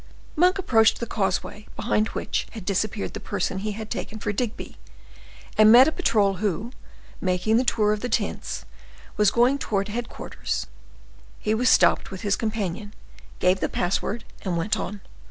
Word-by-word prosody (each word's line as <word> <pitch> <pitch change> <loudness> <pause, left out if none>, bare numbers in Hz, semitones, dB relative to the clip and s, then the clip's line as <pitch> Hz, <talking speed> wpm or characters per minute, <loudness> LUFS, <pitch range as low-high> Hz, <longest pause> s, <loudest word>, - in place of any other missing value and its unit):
Monk 360 +4 +4
approached 225 - +3
the 235 - -2
causeway 210 0 -2
behind 215 -1 +1
which - - -3
had 220 -5 -8
disappeared 200 +1 -1
the - - -5
person 190 -2 -2
he 210 +1 -3
had 220 +1 -7
taken 220 - -4
for 205 -1 -2
Digby, 235 +2 -4 0.8
and 215 0 +8
met 250 +4 +9
a - - +2
patrol 205 - +2
who, 210 +3 -2 0.5
making 185 +4 +1
the 250 - +3
tour 210 -4 +2
of 210 - -3
the 245 - -3
tents, 80 - -2 0.5
was 210 -1 +4
going 245 +6 +3
towards 200 -4 -1
headquarters; 235 +2 -4 0.7
he 215 - -1
was 245 +3 +2
stopped - - +4
with 190 -1 -7
his 205 -3 +1
companion, 210 -2 -3 0.4
gave 185 +1 +2
the - - -1
password, 200 +5 -1 0.2
and 180 -3 -2
went 180 +6 0
on. 205 -1 -5
215 Hz, 165 wpm, -24 LUFS, 195-230 Hz, 0.8 s, met